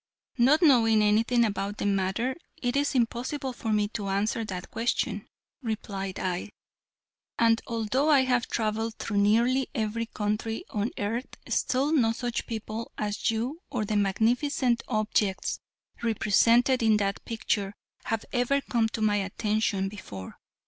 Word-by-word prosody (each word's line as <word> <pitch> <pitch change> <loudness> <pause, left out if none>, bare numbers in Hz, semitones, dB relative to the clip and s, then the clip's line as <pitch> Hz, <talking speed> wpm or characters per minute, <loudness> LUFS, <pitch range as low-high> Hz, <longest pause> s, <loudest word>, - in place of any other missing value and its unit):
"Not 285 +8 +5
knowing 225 -7 +5
anything 225 +3 +3
about 200 0 -2
the - - -3
matter 200 +6 0 0.2
it 245 0 -1
is 280 0 +1
impossible 255 +3 -1
for 225 -2 -3
me 210 -1 +2
to 205 -2 -4
answer 205 +4 0
that 185 -3 -6
question," 230 +2 -1 0.3
replied 200 -5 -4
I; 185 +2 -2 0.9
"and 230 0 +4
although 235 +6 0
I 285 -3 +6
have 250 -2 +1
traveled 220 0 -1
through 210 - -3
nearly 235 +6 +3
every 225 +1 -1
country 215 +1 -2
on 210 +2 -1
earth 225 +5 -2 0.2
still 270 +4 +1
no 235 -8 +3
such 240 0 -3
people 220 0 -5
as 210 -1 -1
you 240 +9 -2
or 245 -6 -2
the 215 - -2
magnificent 235 +5 +1
objects 215 -3 0 0.4
represented 235 +3 +3
in 220 -2 +4
that 200 -1 -1
picture 205 -3 -2 0.3
have 225 -1 -2
ever 245 +3 +2
come 235 -5 0
to 220 - -5
my 210 -1 +3
attention 200 0 0
before. 100 - -9
225 Hz, 140 wpm, -27 LUFS, 210-245 Hz, 0.9 s, I